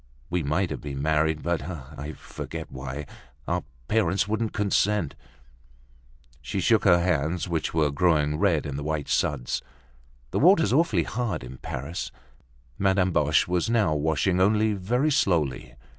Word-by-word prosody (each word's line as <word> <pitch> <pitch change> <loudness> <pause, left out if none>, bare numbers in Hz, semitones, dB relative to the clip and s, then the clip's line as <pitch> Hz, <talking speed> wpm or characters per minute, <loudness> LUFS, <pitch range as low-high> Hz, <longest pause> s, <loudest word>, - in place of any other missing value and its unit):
We 90 0 +1
might 80 +5 0
have - - -4
been 70 -2 -5
married, 75 +1 +1
but—I 75 -3 -4
forget - - -8
why—our 65 +2 -6 0.2
parents 100 -2 +1
wouldn't 110 +1 -1
consent." 105 -4 +1 1.3
She 70 +9 -3
shook 110 +4 +3
her 90 -3 +7
hands, 85 0 0
which 85 -2 -1
were 75 -3 +2
growing 75 -1 +2
red 85 -6 +2
in 70 -2 -4
the 70 - -4
white 75 -1 -2
suds. 65 -5 0 0.7
"The - - 0
water's 165 - +5
awfully 130 - +3
hard 110 - -3
in 65 +1 -9
Paris." 70 +7 -5 0.7
Madame 95 -1 +2
Boche 75 -2 +3
was 90 +3 0
now 110 -9 +2
washing 80 +5 +1
only 105 +2 +3
very 120 +10 0
slowly. 80 - 0
85 Hz, 140 wpm, -26 LUFS, 75-100 Hz, 1.3 s, her